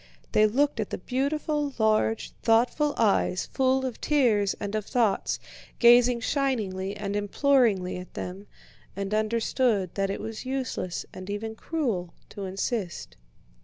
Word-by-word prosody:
They 215 0 +5
looked 275 +3 +1
at 215 - -2
the - - -3
beautiful, 285 - -1
large, 220 0 +1
thoughtful 245 +6 +2
eyes 200 -4 +2
full 265 0 +1
of 250 -3 -5
tears 225 -9 +2
and 205 -1 -4
of 215 -1 -1
thoughts, 235 -6 +1 0.4
gazing 240 0 +6
shiningly 210 -9 -1
and 200 0 -3
imploringly 205 -3 +2
at 180 0 -10
them, 190 +3 -6 0.5
and 200 +1 -3
understood 220 -2 +1
that 195 -1 -1
it 195 - -3
was 220 0 -6
useless 255 -9 -3
and 185 +1 -8
even 215 +2 -3
cruel 220 - -3
to 200 - -6
insist. 190 0 -3
220 Hz, 135 wpm, -27 LUFS, 200-255 Hz, 0.5 s, gazing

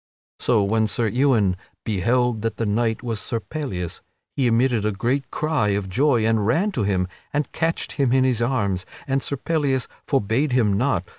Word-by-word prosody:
So 110 -4 +2
when 110 +2 +2
Sir 115 +2 +1
Ewain 110 -5 +2 0.3
beheld 115 +3 +1
that 115 -2 -2
the 115 - -1
knight 110 +2 0
was 115 -3 -2
Sir 115 - -2
Pellias 110 - -5 0.3
he 135 -3 +2
emitted 120 -1 +2
a 105 - +1
great 120 +7 -1
cry 155 -8 0
of 95 -2 -4
joy 120 +1 +2
and 110 -1 +2
ran 170 - +2
to 125 - -2
him 95 -3 +1 0.2
and 145 -2 -1
catched 165 +1 -1
him 135 -4 +1
in 130 0 +4
his 125 -3 +1
arms, 100 -7 0 0.2
and 135 0 0
Sir 140 - -2
Pellias 140 -3 0 0.2
forbade 135 +2 +1
him 110 -5 +3
not. 115 -5 +1
120 Hz, 180 wpm, -23 LUFS, 105-135 Hz, 0.3 s, in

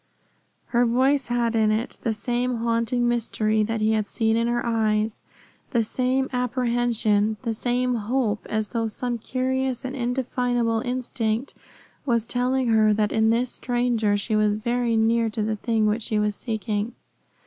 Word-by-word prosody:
Her 240 0 +3
voice 260 +3 +2
had 240 -1 0
in 220 -1 +3
it 215 +2 -1
the 230 - 0
same 245 +3 -1
haunting 230 +1 0
mystery 220 -2 0
that 225 +1 -1
he 215 +1 +3
had 215 -2 0
seen 220 +1 0
in 230 +1 +1
her 240 0 -1
eyes, 220 -1 0 0.5
the 235 -3 +1
same 255 +4 0
apprehension, 240 -4 +1
the 230 -2 -1
same 245 +2 0
hope, 225 -1 -1
as 215 -1 -1
though 225 +3 -1
some 240 +2 -3
curious 260 +1 -2
and 260 +1 -4
indefinable 245 -2 0
instinct 245 -1 -2 0.5
was 235 -4 +1
telling 250 +1 0
her 215 -1 +4
that 210 0 +1
in 220 0 +2
this 235 +2 +1
stranger 240 -4 0
she 215 +2 -2
was 210 -1 +2
very 235 +1 0
near 225 +1 +2
to 215 0 -2
the 215 0 -1
thing 225 0 0
which 215 +2 +1
she 215 0 -1
was 210 0 +1
seeking. 220 0 -3
230 Hz, 160 wpm, -24 LUFS, 220-245 Hz, 0.5 s, her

